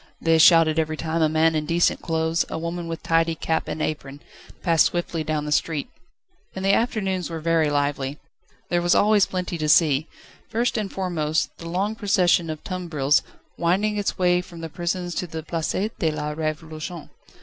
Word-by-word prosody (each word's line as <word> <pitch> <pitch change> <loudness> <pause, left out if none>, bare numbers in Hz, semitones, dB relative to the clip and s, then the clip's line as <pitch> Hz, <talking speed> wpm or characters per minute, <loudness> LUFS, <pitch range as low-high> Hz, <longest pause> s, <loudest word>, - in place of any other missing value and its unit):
they 165 -1 +3
shouted 165 -1 +6
every 155 -1 -1
time 165 +1 -2
a 155 - +4
man 160 +1 +3
in 155 -1 0
decent 170 +1 +2
clothes, 160 0 0
a - - -4
woman 170 +1 -4
with 165 0 -6
tidy 165 0 +2
cap 160 0 -1
and 155 - -3
apron, 140 -2 -4 0.4
passed 165 -4 +4
swiftly 175 -2 -3
down 155 -1 -2
the 150 - -4
street. 150 -1 0 0.6
And 190 0 -4
the 195 - +4
afternoons 195 -5 0
were 165 -1 -4
very 160 -1 +2
lively. 145 -1 -1 0.5
There 175 0 +1
was 175 +1 +3
always 210 -1 +4
plenty 180 -2 -3
to 155 -1 -1
see: 150 -1 +4 0.4
first 235 +2 0
and 210 -4 -2
foremost, 165 -5 -1
the 165 - -7
long 195 +5 -1
procession 185 -6 +2
of 155 -1 -6
tumbrils, 155 -6 +1 0.4
winding 195 +5 +1
its 205 -1 -2
way 180 -1 +3
from 175 -2 -11
the 165 - -5
prisons 175 +2 -3
to 180 - -3
the 160 -1 -6
Place 165 0 -2 0.2
de 160 - +2
la 150 -1 -3
Révolution. 155 +1 -5
165 Hz, 185 wpm, -23 LUFS, 155-180 Hz, 0.6 s, shouted